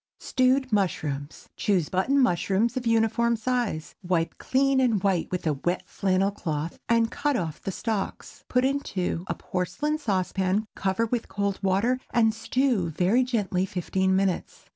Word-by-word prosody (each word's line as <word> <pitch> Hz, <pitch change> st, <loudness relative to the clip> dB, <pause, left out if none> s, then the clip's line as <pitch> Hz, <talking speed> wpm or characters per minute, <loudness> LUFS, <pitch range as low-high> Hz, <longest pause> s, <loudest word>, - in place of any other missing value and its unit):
STEWED 255 Hz, -1 st, +1 dB
MUSHROOMS. 150 Hz, -7 st, -2 dB
Choose 185 Hz, -7 st, +1 dB
button 190 Hz, +10 st, +1 dB
mushrooms 215 Hz, -2 st, +2 dB
of 250 Hz, -2 st, -2 dB
uniform 230 Hz, +1 st, +2 dB
size. 225 Hz, -8 st, -2 dB
Wipe 175 Hz, -3 st, 0 dB
clean 275 Hz, +1 st, +2 dB
and 230 Hz, -7 st, +2 dB
white 190 Hz, -4 st, +1 dB
with 180 Hz, -1 st, -3 dB
a 155 Hz, -, +2 dB
wet 175 Hz, +6 st, -2 dB
flannel 195 Hz, +1 st, +1 dB
cloth, 160 Hz, -4 st, -4 dB
and 230 Hz, -1 st, +3 dB
cut 290 Hz, -1 st, 0 dB
off 160 Hz, -5 st, -4 dB
the 195 Hz, -, -3 dB
stalks. 210 Hz, 0 st, -4 dB
Put 250 Hz, +1 st, +2 dB
into 195 Hz, -11 st, -1 dB
a -, -, -2 dB
porcelain 295 Hz, -, -2 dB
saucepan, 195 Hz, -3 st, 0 dB
cover 190 Hz, +4 st, 0 dB
with 235 Hz, 0 st, -2 dB
cold 200 Hz, -1 st, -1 dB
water, 200 Hz, +7 st, +2 dB
and 225 Hz, -2 st, +3 dB
stew 230 Hz, -5 st, 0 dB
very 185 Hz, +10 st, +2 dB
gently 200 Hz, -7 st, 0 dB
fifteen 190 Hz, +1 st, 0 dB
minutes. 190 Hz, -2 st, -1 dB
200 Hz, 150 wpm, -26 LUFS, 185-240 Hz, -, and